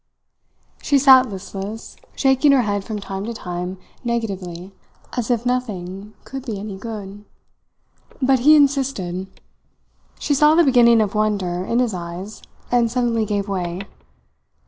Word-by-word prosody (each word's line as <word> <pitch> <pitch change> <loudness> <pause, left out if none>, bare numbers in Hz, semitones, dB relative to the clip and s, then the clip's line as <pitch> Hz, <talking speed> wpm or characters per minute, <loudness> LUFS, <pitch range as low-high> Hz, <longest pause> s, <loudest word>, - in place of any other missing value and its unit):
She 285 - +2
sat 260 -2 +7
listless, 195 +2 -7 0.2
shaking 270 +1 +4
her 260 -3 +4
head 205 -2 -1
from 215 +1 -5
time 195 -1 -5
to 230 +1 -5
time 180 -1 -5 0.3
negatively, 195 -6 -4 0.4
as 245 -1 -2
if 240 -1 0
nothing 210 -5 -3
could 270 -1 -7
be 225 -6 -4
any 205 -1 -6
good. 205 -1 -8 1.0
But 265 -1 +3
he 300 +5 +6
insisted; 270 -11 +1 0.9
she 290 - -1
saw 300 +2 +5
the 340 - +6
beginning 240 -5 +5
of 205 -2 -1
wonder 200 -5 0
in 230 - -1
his 245 -4 +1
eyes, 180 +4 -7 0.3
and 240 -1 +3
suddenly 235 -2 0
gave 205 -1 -1
way. 180 -2 -3
215 Hz, 140 wpm, -21 LUFS, 195-250 Hz, 1.0 s, sat